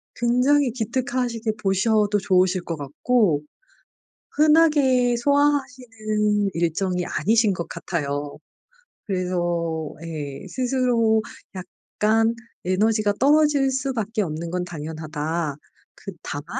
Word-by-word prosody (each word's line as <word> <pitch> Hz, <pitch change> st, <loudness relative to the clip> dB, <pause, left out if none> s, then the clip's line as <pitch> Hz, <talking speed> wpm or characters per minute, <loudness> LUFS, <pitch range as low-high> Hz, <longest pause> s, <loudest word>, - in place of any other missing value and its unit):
굉장히 250 Hz, +3 st, +2 dB
기특하시게 240 Hz, -1 st, -2 dB
보셔도 205 Hz, +2 st, +2 dB
좋으실 185 Hz, -2 st, +2 dB
것 165 Hz, -2 st, -4 dB
같고 150 Hz, -, +1 dB, 0.9 s
흔하게 295 Hz, -6 st, +4 dB
소화하시는 240 Hz, -7 st, 0 dB
일정이 175 Hz, +2 st, -1 dB
아니신 220 Hz, -1 st, +2 dB
것 170 Hz, -2 st, -5 dB
같아요. 145 Hz, -4 st, -4 dB, 0.7 s
그래서 175 Hz, -4 st, -2 dB
예 145 Hz, -4 st, -6 dB
스스로 245 Hz, -4 st, +1 dB, 0.3 s
약간 220 Hz, +4 st, -1 dB, 0.3 s
에너지가 210 Hz, +3 st, +2 dB
떨어질 290 Hz, 0 st, +4 dB
수밖에 245 Hz, -5 st, -2 dB
없는 165 Hz, -1 st, -4 dB
건 180 Hz, 0 st, -2 dB
당연하다. 155 Hz, -1 st, -4 dB, 0.4 s
그 195 Hz, -, -8 dB
다만 145 Hz, +1 st, -6 dB
210 Hz, 230 characters per minute, -23 LUFS, 170-250 Hz, 0.9 s, 흔하게